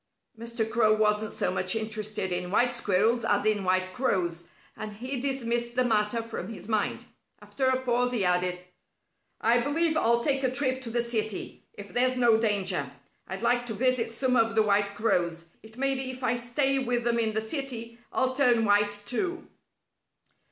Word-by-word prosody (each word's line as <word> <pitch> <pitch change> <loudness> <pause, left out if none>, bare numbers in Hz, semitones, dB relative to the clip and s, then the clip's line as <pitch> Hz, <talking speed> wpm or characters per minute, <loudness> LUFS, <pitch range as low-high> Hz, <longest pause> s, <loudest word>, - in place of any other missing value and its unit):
Mr. 230 0 -3
Crow 220 -2 +3
wasn't 215 0 +1
so - - -1
much 185 +2 0
interested 215 -3 -2
in 180 0 -2
white 245 +5 +2
squirrels 230 +1 +1
as 205 0 +1
in 215 -2 +1
white 185 0 0
crows, 175 -9 -1 0.3
and 215 -1 -7
he 255 +4 -3
dismissed 240 -3 -1
the 255 - +3
matter 220 0 +1
from 225 -3 -6
his 215 - -9
mind. 215 -2 -1 0.3
After 265 -2 -2
a 260 0 +2
pause, 245 -1 0
he 225 -6 +1
added: 180 0 +1 0.8
"I 235 +2 +4
believe 315 +5 +1
I'll 235 -5 +2
take 275 0 +1
a 260 - +3
trip 260 0 0
to 245 - -6
the 235 +1 0
city, 220 -4 -3
if 205 0 -11
there's 255 +1 +2
no 235 -3 +4
danger. 200 -4 0 0.4
I'd 190 +4 -6
like 245 +1 +1
to 220 - -4
visit 255 +1 +1
some 255 +3 0
of 225 -1 +2
the 220 - +4
white 200 -1 +1
crows. 170 -6 0 0.2
It 220 +2 -14
may 275 +1 +2
be 265 -1 -3
if 255 0 -7
I 235 - +2
stay 270 +3 +1
with 245 -2 -1
them 235 0 +1
in 220 -2 0
the - - +2
city, 235 -1 -4
I'll 260 0 0
turn 245 -4 +3
white, 205 0 +2
too." 350 - -3
230 Hz, 185 wpm, -27 LUFS, 210-250 Hz, 0.8 s, I